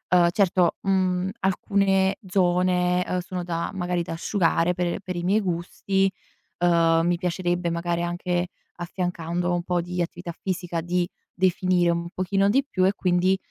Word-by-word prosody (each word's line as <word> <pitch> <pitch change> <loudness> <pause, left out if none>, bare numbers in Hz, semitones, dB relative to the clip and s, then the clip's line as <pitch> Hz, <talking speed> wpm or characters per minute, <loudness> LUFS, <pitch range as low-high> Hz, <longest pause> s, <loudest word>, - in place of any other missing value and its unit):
uhm, 175 -1 +5
certo, 180 -2 +2
mhmm, 185 -1 +1
alcune 195 0 +2
zone, 180 -1 +2
uhm, 180 - -1
sono 180 0 -5
da 170 -1 -3
magari, 180 -2 -1
da 165 - -5
asciugare 170 0 +1
per 175 -1 -2
per 185 -2 -5
i 175 - -3
miei 200 +5 +2
gusti. 195 +2 0 0.5
Uhm, 165 -2 +4
mi 175 0 +2
piacerebbe, 175 -1 -1
magari, 170 0 -1
anche 175 +1 -1 0.3
affiancando 175 0 -2
un 175 0 -1
po' 175 0 0
di 180 +1 -3
attività 175 0 -4
fisica, 175 -3 -2
di 175 +1 0 0.3
definire 185 -1 +2
un 170 0 -2
pochino 195 +2 +1
di 270 +6 +2
più 185 -8 +1
e 190 - +3
quindi, 185 0 +2
180 Hz, 155 wpm, -25 LUFS, 175-185 Hz, 0.5 s, uhm